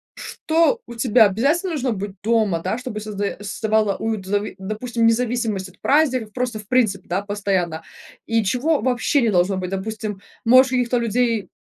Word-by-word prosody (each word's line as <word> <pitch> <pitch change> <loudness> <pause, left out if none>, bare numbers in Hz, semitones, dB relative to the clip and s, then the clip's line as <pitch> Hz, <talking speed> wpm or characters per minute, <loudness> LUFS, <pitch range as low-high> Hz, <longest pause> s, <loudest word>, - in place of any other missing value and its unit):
что 335 +9 0
у - - -9
тебя 230 -1 +4
обязательно 285 - +1
должно 265 -4 -1
быть 200 -1 -4
дома, 215 -6 +2
да, 185 +6 -2
чтобы 250 -4 -5
создаё 205 -1 -3
создавала 215 0 0
уют, 220 -4 -3
в - - -10
зави 205 -1 -1
допустим, 230 +4 -1
независимость 225 -5 0
от 185 - -22
праздников, 260 -7 +2
просто 245 -3 -2
в 210 - -12
принципе, 220 -7 +1
да, 185 +3 0
постоянно, 190 -5 -2 0.4
и 225 -1 +1
чего 260 +8 +1
вообще 255 +3 +1
не 230 - +2
должно 185 +1 +2
быть? 185 0 -4
Допустим, 210 0 -4 0.2
может, 255 +2 +6
каких-то 245 -1 +1
людей 235 -2 0
220 Hz, 170 wpm, -21 LUFS, 200-250 Hz, 0.4 s, может